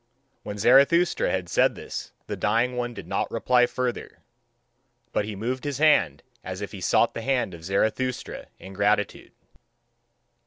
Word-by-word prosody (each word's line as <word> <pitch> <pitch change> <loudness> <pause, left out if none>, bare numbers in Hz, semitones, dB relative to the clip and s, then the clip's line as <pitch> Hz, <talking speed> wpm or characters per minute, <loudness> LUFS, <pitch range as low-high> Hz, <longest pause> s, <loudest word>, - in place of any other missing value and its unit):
When 105 -1 -7
Zarathustra 140 - +4
had 90 -2 -2
said - - +2
this - - -7
the - - -4
dying 115 +5 +1
one 120 -1 -3
did - - -9
not - - -1
reply 125 -1 +3
further; 125 -1 -4 0.9
but 105 - 0
he 105 -1 -5
moved 125 +6 -3
his 145 -3 -3
hand 100 - +3 0.2
as 95 0 -6
if 100 - -6
he 100 - -9
sought 115 - +2
the - - -5
hand 125 -6 0
of 85 -1 -11
Zarathustra 110 +7 -2
in 95 - -11
gratitude. 105 +1 0
115 Hz, 155 wpm, -25 LUFS, 100-125 Hz, 0.9 s, Zarathustra